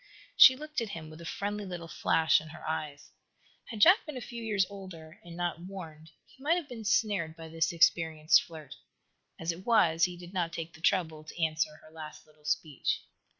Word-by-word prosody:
She 260 - +10
looked 300 0 -4
at 225 - -3
him 160 -4 -7
with 155 +1 -11
a 165 - -8
friendly, 205 +3 -3
little 175 -3 -6
flash 160 -1 +3
in 155 - -11
her 165 - -10
eyes. 155 -2 -4 0.5
Had 220 -3 -7
Jack 370 - +7
been 300 -4 -6
a - - -5
few 235 0 -7
years 205 -4 +1
older, 185 -5 -11
and 170 -1 -10
not 175 -2 -2
warned, 165 -4 -9 0.2
he - - -22
might 310 +5 +3
have 345 -5 -3
been 235 -4 -8
snared 205 -7 +1
by 165 -1 -10
this 165 0 0
experienced 160 -2 +4
flirt. 155 -5 -10 0.7
As 165 +1 -1
it 170 +3 -9
was, 170 -8 +4
he 180 -1 -5
did 175 +1 -11
not 170 -3 -1
take 165 -1 -5
the 155 - -15
trouble 160 -5 +1
to 165 +1 -5
answer 155 -1 -1
her 155 - -16
last 155 -1 -10
little 155 -1 -25
speech. 150 -2 -1
170 Hz, 205 wpm, -30 LUFS, 160-200 Hz, 0.7 s, She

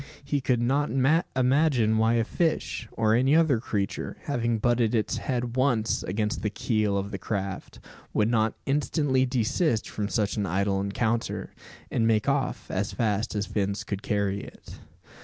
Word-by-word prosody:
He 140 0 -1
could 125 -2 +1
not 140 +4 +1 0.5
imagine 130 -4 +3
why 110 +1 +3
a 115 - +3
fish, 155 -3 -1
or 110 -1 +2
any 130 +5 +4
other 160 -7 +4
creature, 100 -4 -3
having 120 -4 0
butted 120 0 +2
its 110 - 0
head 125 -2 -2
once 125 -4 +1
against 105 +2 -2
the 105 - 0
"keel" 105 -1 0
of 100 +1 -3
the 100 - -4
craft, 100 -3 -4 0.3
would 105 - +2
not 110 -1 +1
instantly 135 -2 +1
desist 125 +1 0
from 105 -1 -3
such 105 -2 0
an 100 -2 0
idle 95 +2 0
encounter, 110 +3 -2 0.4
and 115 - +2
make 110 +1 +2
off 140 -2 -1
as 100 +2 -1
fast 110 -1 -1
as 105 0 0
fins 100 0 -2
could 100 -1 -4
carry 100 -2 0
it. - - -12
115 Hz, 160 wpm, -27 LUFS, 105-130 Hz, 0.5 s, any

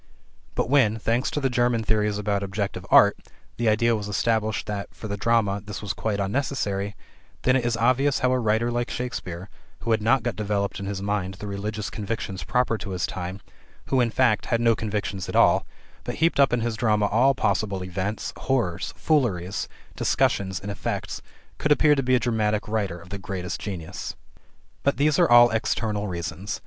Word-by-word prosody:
But - - 0
when, 120 -5 +3
thanks 115 +3 0
to - - -2
the 135 - +1
German 120 -2 +2
theories 105 -1 +1
about 105 -1 -1
objective 100 0 -3
art, - - +6 0.4
the 115 -1 +2
idea 115 +2 +3
was 105 -2 -4
established 110 0 0
that, 105 -1 -4
for 110 - -7
the 100 - -3
drama, 105 -2 +1
this 105 0 -6
was 100 - -2
quite 105 -2 -2
unnecessary, 100 -2 -1 0.5
then 130 - +4
it 130 - +2
is 120 -1 0
obvious 130 +4 +3
how 130 -2 +2
a 130 - +2
writer 110 +1 +1
like 120 0 -1
Shakespeare 95 -7 -5 0.3
who 115 - -2
had 110 -1 +2
not 115 +3 +3
got 120 - -2
developed 100 -1 -1
in 100 - -5
his 100 -1 -4
mind 100 -2 -2
the 105 - -8
religious 105 +1 -4
convictions 100 -3 -4
proper 125 -3 +1
to 100 - -6
his 90 -2 -1
time, 95 +2 -5 0.5
who, 130 -2 +3
in 120 - +2
fact, 115 -2 +2
had 115 - +1
no 115 -1 +4
convictions 100 -4 -3
at - - -4
all, - - +4 0.4
but - - -4
heaped 165 -2 +2
up 140 -2 +5
in 120 -1 +1
his 115 -1 -1
drama 105 -2 +2
all 125 +7 +3
possible 100 -6 0
events, 95 +3 -3
horrors, 120 -11 -1
fooleries, 100 - 0 0.3
discussions, 95 -2 +1
and 100 - -5
effects 100 - -4 0.4
could 150 - 0
appear 150 0 +5
to 140 - +1
be 130 0 +2
a - - +3
dramatic 110 -3 0
writer 105 -5 -1
of 90 +1 -14
the 100 +1 -5
greatest 95 -2 -5
genius. 90 -3 -5 0.7
But 140 - +1
these 145 +1 +3
are - - +5
all 120 0 +8
external 110 -2 -1
reasons. 90 +2 -4
110 Hz, 190 wpm, -25 LUFS, 100-120 Hz, 0.7 s, all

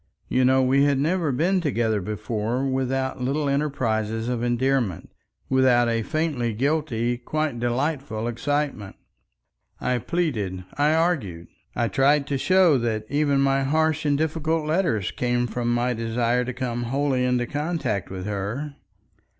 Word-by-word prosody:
You 130 - +2
know, 130 +1 +4
we 135 +2 +3
had 140 -1 +2
never 160 +2 +1
been 180 +8 +1
together 115 -9 0
before 110 +5 -2
without 130 0 -1
little 140 +4 0
enterprises 115 -6 -1
of 125 -2 -1
endearment, 120 - 0 0.4
without 130 -2 +4
a 115 -1 0
faintly 135 -4 -1
guilty, 120 -3 0
quite 150 0 -2
delightful 120 -2 -1
excitement. 135 -4 -2 0.8
I 125 -1 0
pleaded, 110 - -2
I 150 +2 +2
argued. 125 - -1 0.3
I 120 - +1
tried 140 +7 +3
to 140 -2 -1
show 185 -4 +4
that 110 -2 -2
even 145 -1 +2
my 135 0 +2
harsh 155 +3 +1
and 145 -2 +2
difficult 160 +1 -1
letters 155 - 0
came 120 0 0
from 120 0 -2
my 120 +1 +1
desire 115 +2 0
to 130 - -3
come 120 -2 -3
wholly 135 +1 0
into 125 -1 +1
contact 145 - -2
with 95 -1 -6
her. 105 +9 -3
130 Hz, 140 wpm, -24 LUFS, 115-145 Hz, 0.8 s, know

